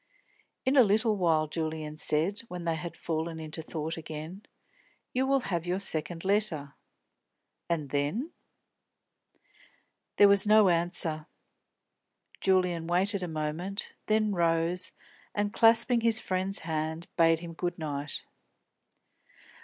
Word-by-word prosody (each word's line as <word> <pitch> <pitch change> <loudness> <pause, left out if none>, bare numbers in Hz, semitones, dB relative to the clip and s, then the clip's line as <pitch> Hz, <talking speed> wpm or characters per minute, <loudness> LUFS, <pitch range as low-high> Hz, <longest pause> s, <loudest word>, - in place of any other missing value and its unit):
"In 260 +2 +2
a - - +10
little 215 +1 +2
while," 165 -5 +2
Julian 155 -1 -4
said, 160 +7 0
when 180 -3 -7
they 165 - +1
had 170 +1 -6
fallen 160 0 -3
into 155 0 -4
thought 160 0 -4
again, 160 +4 -7 0.7
"you 260 +1 +1
will 275 0 +2
have 175 -6 -3
your 180 +1 0
second 165 -2 -4
letter. 190 -9 0 1.0
And 155 -5 -2
then?" 150 - -1 1.8
There 205 - +7
was 200 +1 +4
no 215 -2 +6
answer. 170 -2 +1 1.1
Julian 180 -3 +1
waited 190 +3 +1
a 180 - -3
moment, 160 +5 -4
then 215 -1 +2
rose 170 +1 +1 0.4
and, 205 0 -1
clasping 230 +1 +5
his 225 -1 +5
friend's 190 +1 -1
hand, 160 +1 -3
bade 165 -1 +4
him 170 -1 -7
good 175 +2 -3
night. 145 -2 -5
170 Hz, 120 wpm, -29 LUFS, 160-200 Hz, 1.8 s, a